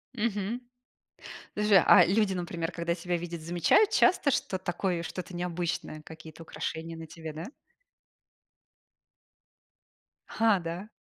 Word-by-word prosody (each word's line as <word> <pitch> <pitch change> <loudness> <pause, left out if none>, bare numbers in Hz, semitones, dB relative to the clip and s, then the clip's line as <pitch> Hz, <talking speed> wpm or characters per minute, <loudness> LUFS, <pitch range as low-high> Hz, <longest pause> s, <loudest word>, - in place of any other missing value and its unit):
Мгм. 215 +1 -2 0.9
Подожди, 210 -1 +3
а 185 - +8
люди, 200 +1 +2
например, 170 -2 -3
когда 170 0 -2
тебя 175 0 -2
видят, 170 -1 -6
замечают 175 - +3
часто, 365 -8 +4
что 190 - -1
такое 175 -1 -2
что-то 180 +1 -6
необычное, 175 -3 -3
какие-то 160 +1 -12
украшения 165 0 -5
на 165 - -7
тебе, 160 0 -8
да? 160 +3 -6 2.8
А, 220 -4 +2
да? 170 +4 -5
175 Hz, 115 wpm, -29 LUFS, 165-195 Hz, 2.8 s, а